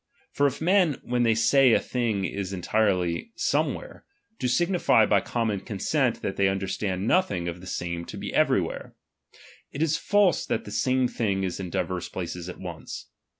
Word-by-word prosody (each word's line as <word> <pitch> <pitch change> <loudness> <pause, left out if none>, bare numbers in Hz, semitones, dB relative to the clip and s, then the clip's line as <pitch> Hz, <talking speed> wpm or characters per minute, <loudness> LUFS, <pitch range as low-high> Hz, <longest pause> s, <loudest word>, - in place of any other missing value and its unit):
For 145 - +2
if 135 - -3
^en, 175 -3 +2
when 125 0 0
they 115 -2 +3
say 130 +2 +5
a - - +5
thing 115 -6 -1
is 95 +1 -4
entirely 95 - 0
somewhere, - - -1 0.4
do 125 - 0
signif^' 175 - +3
by 100 -2 +3
common 115 -4 -1
consent 120 +5 -1
that 95 - -3
they 100 - +3
understand 95 0 -2
nothing 110 - +1
of 85 0 -5
the 90 - -10
same 85 -1 -4
to - - -8
be - - -5
elsewhere; - - 0 0.8
it 145 - -1
is 155 -1 +1
false 205 -3 +3
that - - -1
the 105 - -8
same 130 +3 +2
thing 100 -6 -1
is 95 0 -3
in 95 -2 -5
divers 90 -1 -2
places 90 -1 -5
at 90 - -8
once. 85 -7 -8
105 Hz, 175 wpm, -26 LUFS, 95-130 Hz, 0.8 s, say